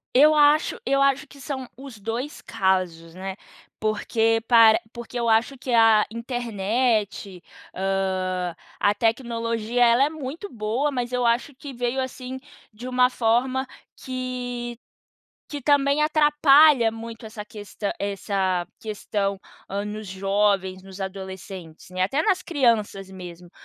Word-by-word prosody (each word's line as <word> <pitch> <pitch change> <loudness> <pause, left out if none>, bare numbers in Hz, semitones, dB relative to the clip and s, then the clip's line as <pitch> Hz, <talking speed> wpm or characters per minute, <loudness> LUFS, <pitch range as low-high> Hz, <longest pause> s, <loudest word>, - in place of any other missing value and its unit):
Eu 300 +3 +7
acho 300 +5 +4
eu 275 -7 +2
acho 275 +2 +2
que 280 -1 -16
são 265 -2 -5
os 265 -4 -10
2 230 +8 -4
casos, 180 -4 -1
né, 190 +1 -6 0.4
porque 225 +1 +1
para 225 -2 +7
porque 240 0 -7
eu 235 -1 0
acho 225 +5 +2
que 255 0 -5
a 225 -2 +5
internet, 225 -4 -1 0.3
hã, 185 -2 -1 0.2
a 205 - +3
tecnologia, 230 +1 0
ela 235 +3 +5
é 285 - +2
muito 315 +5 -7
boa, 235 +6 -1
mas 245 -2 -3
eu 250 -1 +1
acho 235 +4 +1
que 275 +1 -9
veio, 245 +2 -1
assim, 260 0 -6 0.3
de 240 +4 -7
uma 250 0 +4
forma 255 +2 +1 0.3
que 245 -2 -5 0.7
que 290 -1 -5
também 285 +1 +3
atrapalha 295 -4 +5
muito 225 0 -8
essa 215 -1 -8
questã 205 -1 -5
essa 195 -3 -1
questão, 205 -2 -3 0.3
hã, 200 +1 -3
nos 210 0 -6
jovens, 195 0 0
nos 190 0 -12
adolescentes, 190 -3 -8
né, 185 0 -3
até 270 +12 +1
nas 385 -1 +2
crianças 220 - 0
mesmo. 180 -2 -10
230 Hz, 135 wpm, -24 LUFS, 200-260 Hz, 0.7 s, Eu